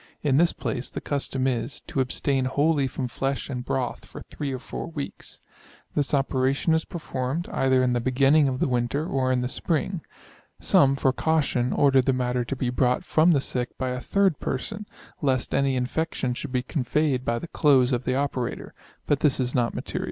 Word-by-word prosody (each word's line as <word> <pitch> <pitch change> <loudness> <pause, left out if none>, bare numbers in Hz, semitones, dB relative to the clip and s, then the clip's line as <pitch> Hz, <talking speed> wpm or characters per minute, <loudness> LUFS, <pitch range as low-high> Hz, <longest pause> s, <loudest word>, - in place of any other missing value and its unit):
In 140 -2 +3
this 170 +2 +4
place 130 -1 -4
the - - -5
custom 135 -2 -2
is, 125 0 -1
to 135 - -2
abstain 130 +1 0
wholly 145 +1 +2
from 130 0 -3
flesh 135 +3 -3
and 125 -2 -4
broth 125 0 -2
for - - -10
3 145 -2 -4
or 130 - -2
4 125 - -6
weeks. 145 -4 -7 0.5
This 145 -2 0
operation 135 +3 +1
is 160 0 +1
performed, 155 -1 -3
either 130 -1 +2
in 125 -1 +2
the 120 - +1
beginning 135 +4 +4
of 130 -1 -2
the - - +2
winter, 125 +4 0
or 130 -5 0
in 125 -1 +1
the 125 - -1
spring. 165 +6 -1 0.6
Some, 135 -1 +4
for 135 -1 +1
caution, 140 -6 +1
order 135 -2 +4
the 130 +1 +1
matter 125 -1 0
to 130 +3 -4
be 125 -1 -1
brought 125 0 +1
from 160 +2 +3
the 145 - +3
sick 125 -2 -3
by 130 - -2
a 125 0 -3
3d 195 +2 +1
person, 205 +11 -4 0.3
lest 130 -4 0
any 140 -1 +2
infection 130 0 -1
should 135 +2 -6
be 125 -1 0
conveyed 135 -1 0
by 115 -1 0
the 170 - -6
clothes 135 -5 +3
of 125 0 0
the 130 - 0
operator; 135 -3 -2 0.3
but 145 - +1
this 145 -4 +2
is 125 -1 0
not 120 -2 0
material. - - -4
135 Hz, 195 wpm, -25 LUFS, 125-145 Hz, 0.6 s, this